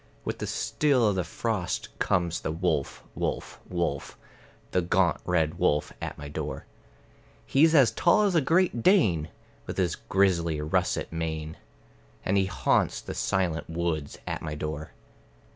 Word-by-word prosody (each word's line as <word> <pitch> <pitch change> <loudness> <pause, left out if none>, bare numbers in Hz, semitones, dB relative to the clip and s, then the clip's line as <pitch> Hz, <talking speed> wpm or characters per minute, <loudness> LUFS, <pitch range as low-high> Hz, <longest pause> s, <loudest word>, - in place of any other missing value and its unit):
With - - -3
the - - -3
still 135 -6 +2
of 100 - 0
the 90 - 0
frost 90 +1 -2
comes 85 -1 +1
the - - -2
wolf, 80 -4 -1
wolf, - - -3
wolf, 85 -2 -2 0.5
The 90 - +2
gaunt 85 0 +2
red 85 -2 +1
wolf 75 0 +1
at - - -5
my 75 - -7
door. 70 - -5 0.8
He's 160 +4 +4
as 135 -6 +6
tall 210 +5 +4
as 200 -2 +2
a 165 - +4
Great 165 -3 +2
Dane, 105 - +3 0.4
with - - -5
his - - +1
grizzly 85 -5 +1
russet 75 +1 0
mane; 80 -1 -3 0.7
And 95 - +1
he 95 -1 +3
haunts 90 - +1
the - - -7
silent 90 -5 -1
woods 80 -3 -2
at - - -3
my 75 -1 -4
door. 75 0 -4
85 Hz, 150 wpm, -27 LUFS, 80-110 Hz, 0.8 s, as